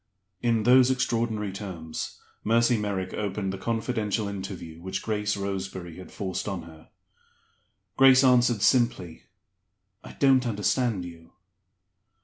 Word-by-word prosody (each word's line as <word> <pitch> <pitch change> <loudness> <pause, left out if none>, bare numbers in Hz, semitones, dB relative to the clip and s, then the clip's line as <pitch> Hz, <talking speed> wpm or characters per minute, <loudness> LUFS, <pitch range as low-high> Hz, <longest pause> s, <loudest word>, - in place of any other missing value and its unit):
In 115 -2 +1
those 125 +2 +6
extraordinary 115 -5 -1
terms 90 -5 -6 0.2
Mercy 115 +2 +3
Merrick 100 -3 -3
opened 100 -2 -3
the 95 - -6
confidential 110 -1 -1
interview 95 -5 -7
which 95 +2 -4
Grace 105 -2 -1
Roseberry 95 -3 -5
had 95 - -11
forced 95 0 -4
on 95 -5 -4
her. 80 -1 -15 1.1
Grace 135 0 +7
answered, 125 -4 +4
simply, 115 -10 +1 0.8
"I - - -11
don't 130 -2 +3
understand 105 -1 0
you." 85 -1 -12
105 Hz, 120 wpm, -26 LUFS, 95-120 Hz, 1.1 s, Grace